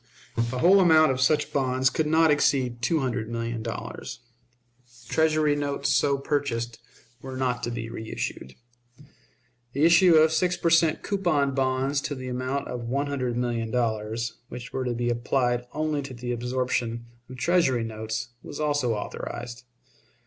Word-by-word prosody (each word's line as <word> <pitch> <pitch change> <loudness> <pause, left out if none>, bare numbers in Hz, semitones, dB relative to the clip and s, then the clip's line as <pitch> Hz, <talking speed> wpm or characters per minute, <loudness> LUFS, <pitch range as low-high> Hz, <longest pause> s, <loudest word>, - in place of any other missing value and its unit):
The 115 +2 -1
whole 185 +9 +6
amount 160 -5 +6
of 130 -1 -2
such 150 +3 +2
bonds 130 -1 +2
could 160 - 0
not 160 0 +4
exceed 130 -5 +1
two 155 +6 +1
hundred 120 -4 -2
million 115 0 -3
dollars. 115 +1 -6 0.9
Treasury 155 -2 +2
notes 140 -1 -1
so 140 -1 +2
purchased 130 -5 -2 0.4
were 130 -1 -7
not 125 -2 -1
to - - -2
be 120 -1 -4
reissued. 110 - -6 1.2
The 140 - 0
issue 170 +1 +6
of 155 0 +6
six 180 +3 +1
per 170 - +1
cent. 165 -1 +3
coupon 165 -9 +1
bonds 135 +1 0
to 145 - -3
the 130 -1 -6
amount 130 +3 -2
of 120 -1 -5
one 140 +3 0
hundred 130 -4 -2
million 120 -2 -1
dollars, 115 -1 -2
which 125 0 -8
were 130 -1 -2
to 120 -1 -1
be 120 +1 0
applied 120 0 0
only 155 -1 -1
to 135 -2 -8
the 120 +1 -5
absorption 120 -1 -2 0.2
of 130 - -9
Treasury 135 -7 +2
notes, 110 0 -4
was 145 - -8
also 145 -6 +1
authorized. 120 +3 -6
130 Hz, 155 wpm, -26 LUFS, 120-145 Hz, 1.2 s, whole